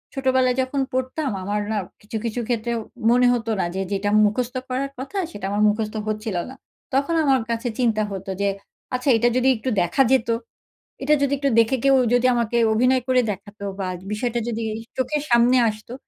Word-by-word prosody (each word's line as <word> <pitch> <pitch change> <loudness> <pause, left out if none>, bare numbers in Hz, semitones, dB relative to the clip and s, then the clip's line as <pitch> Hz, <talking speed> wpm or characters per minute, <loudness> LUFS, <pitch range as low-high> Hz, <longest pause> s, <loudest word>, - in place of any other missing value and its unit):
ছোটবেলায় 260 -1 +2
যখন 270 +2 -1
পড়তাম 260 +2 -1
আমার 205 +2 -1
না 215 - 0 0.2
কিছু, 215 +2 -5
কিছু 230 +1 -2
ক্ষেত্রে 235 -1 -1 0.4
মনে 245 +1 +5
হতো 230 -2 -2
না - - +1
যে 190 - -1
যেটা 200 +1 0 0.2
মুখস্থ 245 +4 -1
করার 275 +2 -2
কথা, 335 +10 -6
সেটা 205 - -7
আমার 205 +1 0
মুখস্থ 215 0 -2
হচ্ছিল 215 -2 -3
না। 265 - -10 0.4
তখন 280 +5 +1
আমার 265 -4 +3
কাছে 230 +1 -2
চিন্তা 220 -3 +2
হতো 195 0 -6
যে, 200 - +2 0.5
আচ্ছা 255 +2 0
এটা 240 +2 +3
যদি 255 +1 +2
একটু 255 +4 -3
দেখা 175 +10 +1
যেত, 240 -3 +2 0.7
এটা 300 +2 +3
যদি 280 0 +1
একটু 280 0 0
দেখে 230 +4 +3
কেউ 275 -1 +5 0.2
যদি 245 +1 +3
আমাকে 235 0 0 0.2
অভিনয় 250 +3 +3
করে 255 -1 +4
দেখাতো 200 +1 -9 0.2
বা, 190 - -2 0.2
বিষয়টা 240 +2 -1
যদি 230 -1 -2 0.2
ই - - -9
চোখের 285 +3 -1
সামনে 240 +2 +5
আসতো, 215 +3 -8
240 Hz, 185 wpm, -22 LUFS, 215-260 Hz, 0.7 s, মনে